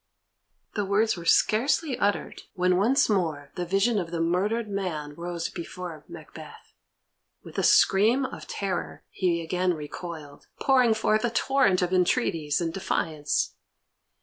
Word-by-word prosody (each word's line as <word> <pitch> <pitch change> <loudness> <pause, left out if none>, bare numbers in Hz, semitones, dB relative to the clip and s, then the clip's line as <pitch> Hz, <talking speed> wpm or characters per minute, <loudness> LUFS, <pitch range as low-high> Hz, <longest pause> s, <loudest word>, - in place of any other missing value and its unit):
The 205 - -1
words 210 +3 +2
were 170 -2 -9
scarcely 260 - +2
uttered, 205 0 -1
when 180 0 +2
once 255 +9 +3
more 160 -9 -1
the 175 -1 -4
vision 195 +4 +2
of 170 -3 -4
the 170 0 -3
murdered 195 +7 0
man 175 -7 -4
rose 170 +1 -4
before 170 -3 -7
Macbeth. - - -12 0.7
With - - -6
a - - 0
scream 225 +8 +4
of - - -8
terror 195 -3 -4
he 175 -3 0
again 180 +2 0
recoiled, 155 -1 -8
pouring 255 -4 +4
forth 215 0 +1
a 240 - +2
torrent 230 -6 +2
of 180 +1 -1
entreaties 165 -4 +1
and 165 -2 -2
defiance. 155 -6 -1
185 Hz, 140 wpm, -26 LUFS, 170-215 Hz, 0.7 s, scream